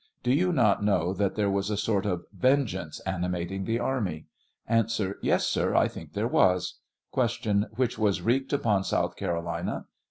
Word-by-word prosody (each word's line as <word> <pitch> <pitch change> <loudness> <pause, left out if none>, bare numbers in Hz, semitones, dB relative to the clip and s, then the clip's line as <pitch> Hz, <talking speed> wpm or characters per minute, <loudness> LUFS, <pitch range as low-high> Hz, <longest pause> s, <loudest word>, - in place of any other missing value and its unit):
Do 125 - +2
you 180 +6 +2
not 110 - +3
know 90 -3 +2
that 100 0 0
there 105 -2 +1
was 100 +1 0
a 105 - -1
sort 105 -1 0
of 90 -3 -2
venge 130 +4 +2
ance 80 -5 -6
animating 90 0 -2
the 115 0 0
army? 110 -11 -2 0.4
A. 115 0 +4
Tes, 105 -4 0
sir; - - +1
I - - +5
think - - -10
there - - 0
was. 90 -1 +2 0.3
Q. 110 -4 +1
Which 125 -1 0
was 100 -4 +1
wreaked 130 +6 +1
upon 110 -9 +2
South - - 0
Carolina 85 0 -3
100 Hz, 170 wpm, -27 LUFS, 90-115 Hz, 0.4 s, I